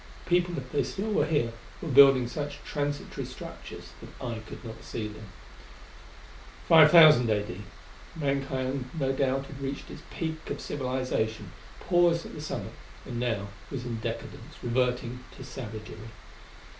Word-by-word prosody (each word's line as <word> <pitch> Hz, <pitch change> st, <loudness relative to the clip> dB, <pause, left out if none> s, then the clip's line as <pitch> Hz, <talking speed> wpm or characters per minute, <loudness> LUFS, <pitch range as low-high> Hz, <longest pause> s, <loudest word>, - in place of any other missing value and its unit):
People, 175 Hz, 0 st, +2 dB
if 130 Hz, -2 st, -6 dB
they 145 Hz, -, +2 dB
still 215 Hz, +3 st, -3 dB
were -, -, +2 dB
here, 120 Hz, -8 st, +1 dB, 0.3 s
were -, -, -6 dB
building 135 Hz, -3 st, +7 dB
such 145 Hz, +3 st, -4 dB
transitory 145 Hz, -1 st, -3 dB
structures -, -, -9 dB
that -, -, -10 dB
I 120 Hz, -3 st, -4 dB
could 110 Hz, +3 st, -10 dB
not 115 Hz, -1 st, -8 dB
see 110 Hz, -2 st, -4 dB
them. 105 Hz, 0 st, -10 dB, 1.4 s
5,000 155 Hz, -6 st, +8 dB
A.D. 105 Hz, -3 st, -1 dB, 0.5 s
Mankind 135 Hz, -3 st, -1 dB
no 135 Hz, -1 st, +1 dB
doubt 135 Hz, 0 st, 0 dB
had 140 Hz, 0 st, -10 dB
reached 135 Hz, 0 st, -4 dB
its -, -, -9 dB
peak 160 Hz, -1 st, -4 dB
of -, -, -3 dB
civilization, 125 Hz, -7 st, -2 dB, 0.3 s
paused 175 Hz, -2 st, +3 dB
at -, -, -9 dB
the -, -, -7 dB
summit 150 Hz, -, -5 dB, 0.3 s
and 120 Hz, -, -4 dB
now 110 Hz, -5 st, -1 dB, 0.2 s
was 130 Hz, -3 st, -5 dB
in 120 Hz, -2 st, -3 dB
decadence, -, -, -6 dB
reverting 125 Hz, 0 st, 0 dB
to -, -, -8 dB
savagery. 110 Hz, -4 st, -7 dB
130 Hz, 145 wpm, -28 LUFS, 120-145 Hz, 1.4 s, 5,000